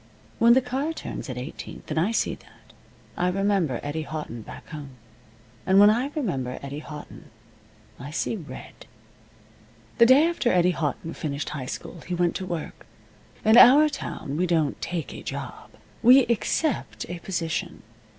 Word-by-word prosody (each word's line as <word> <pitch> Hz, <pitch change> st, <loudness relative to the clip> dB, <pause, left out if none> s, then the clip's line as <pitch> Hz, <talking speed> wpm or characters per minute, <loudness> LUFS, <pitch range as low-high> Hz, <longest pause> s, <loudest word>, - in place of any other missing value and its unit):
When 235 Hz, +1 st, +7 dB
the 260 Hz, -, +5 dB
car 270 Hz, +6 st, -2 dB
turns 160 Hz, -, -7 dB
at 125 Hz, -, -5 dB
Eighteenth, 125 Hz, +4 st, -8 dB
and 155 Hz, -, +1 dB
I 175 Hz, +6 st, +2 dB
see 230 Hz, -, 0 dB
that, -, -, -17 dB, 0.4 s
I 180 Hz, -, 0 dB
remember 190 Hz, -, +1 dB
Eddie 145 Hz, +2 st, -3 dB
Houghton 155 Hz, -7 st, -6 dB
back -, -, -11 dB
home. 145 Hz, -4 st, -8 dB, 0.7 s
And 190 Hz, +1 st, +4 dB
when 205 Hz, +1 st, +8 dB
I 240 Hz, +5 st, 0 dB
remember 135 Hz, -, -2 dB
Eddie 140 Hz, +1 st, -5 dB
Houghton 150 Hz, -1 st, -10 dB, 0.7 s
I 135 Hz, -, -7 dB
see 160 Hz, +8 st, -2 dB
red. 150 Hz, -10 st, -10 dB, 1.1 s
The 235 Hz, -, +8 dB
day 270 Hz, +5 st, +7 dB
after 335 Hz, -8 st, 0 dB
Eddie 180 Hz, 0 st, +4 dB
Houghton 160 Hz, 0 st, -3 dB
finished 145 Hz, -2 st, -4 dB
high 135 Hz, -4 st, -5 dB
school 170 Hz, -, -7 dB
he 180 Hz, -, -2 dB
went 175 Hz, -1 st, +1 dB
to 185 Hz, -, -6 dB
work. 170 Hz, -3 st, -6 dB, 0.6 s
In 220 Hz, +2 st, +6 dB
our 290 Hz, +5 st, +8 dB
town 155 Hz, -, -5 dB
we 180 Hz, +2 st, +1 dB
don't 160 Hz, -4 st, 0 dB
take 170 Hz, -3 st, -4 dB
a -, -, -8 dB
job. -, -, -7 dB, 0.3 s
We 255 Hz, +2 st, +7 dB
accept 240 Hz, +5 st, -1 dB
a 175 Hz, 0 st, -6 dB
position. 175 Hz, 0 st, -3 dB
175 Hz, 160 wpm, -25 LUFS, 150-230 Hz, 1.1 s, when